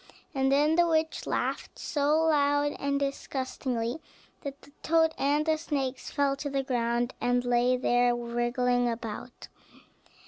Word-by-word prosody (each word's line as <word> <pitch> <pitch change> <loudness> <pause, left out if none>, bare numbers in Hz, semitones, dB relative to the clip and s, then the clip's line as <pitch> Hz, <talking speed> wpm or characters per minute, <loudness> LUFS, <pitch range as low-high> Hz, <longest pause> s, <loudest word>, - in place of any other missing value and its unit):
And 270 -1 +1
then 300 +4 +3
the 345 0 +5
witch 320 -1 0
laughed - - -2
so 300 +2 +1
loud 290 -2 +2
and 280 0 0
disgustingly, 260 -2 -3 0.4
that 280 0 -7
the - - -17
toad 320 0 +3
and 290 +2 +1
the 315 -1 +2
snakes 275 -5 -3
fell 280 -2 +1
to 285 +1 -4
the 275 -1 -1
ground, 240 -1 0
and 245 0 +1
lay 245 +1 +3
there 245 -1 +2
wriggling 240 +1 0
about. 230 +1 -6
275 Hz, 140 wpm, -28 LUFS, 245-290 Hz, 0.4 s, the